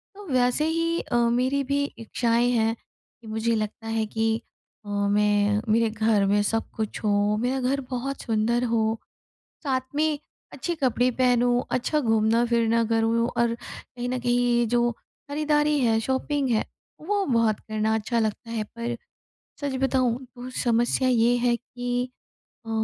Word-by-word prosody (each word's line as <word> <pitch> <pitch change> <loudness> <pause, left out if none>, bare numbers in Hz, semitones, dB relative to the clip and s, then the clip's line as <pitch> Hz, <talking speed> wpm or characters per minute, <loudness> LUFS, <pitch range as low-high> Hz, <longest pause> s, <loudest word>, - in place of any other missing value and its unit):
तो 410 0 -11
वैसे 250 +3 +2
ही 330 +1 0
अ, - - -4
मेरी 260 +4 +1
भी 280 +1 0
इच्छाएँ 235 +1 +1
हैं, 225 -1 +2 0.5
मुझे 220 +1 0
लगता 215 +1 -4
है 225 0 0
कि 225 +1 0 0.5
अ, 205 - -9
मैं 205 0 +2
मेरे 230 0 +3
घर 215 -2 +2
में 205 +1 +3
सब 225 +2 -1
कुछ 220 -2 -3
हो, 205 0 +2
मेरा 250 +4 0
घर 275 +1 0
बहुत 265 +2 -3
सुंदर 230 +2 +1
हो, 225 -2 +1 0.6
साथ 265 -4 0
में 305 0 +1 0.3
अच्छे 345 - -3
कपड़े 255 -4 +1
पहनूँ, 245 0 +2
अच्छा 300 +5 0
घूमना-फिरना 230 0 +2
करूँ 225 +1 +2
और 235 -1 +2
कहीं 245 +1 -8
न 255 +1 -1
कहीं 240 -1 +2
जो 240 +1 +2 0.4
खरीदारी 295 0 +2
है, 225 -3 +3
शॉपिंग 265 +3 -1
है 220 -2 +2 0.4
वो 405 -1 +1
बहुत 230 -5 +2
करना 215 0 -1
अच्छा 220 +2 -1
लगता 220 +1 -2
है। 225 -2 -2
पर 235 +1 -3 0.7
सच 285 -2 -2
बताऊँ 255 -3 +2 0.2
तो 245 +1 -7
समस्या 240 +2 +2
ये 240 0 +4
है 240 0 +2
कि 245 +1 -3 0.6
अ, - - -6
235 Hz, 150 wpm, -25 LUFS, 225-255 Hz, 0.7 s, ये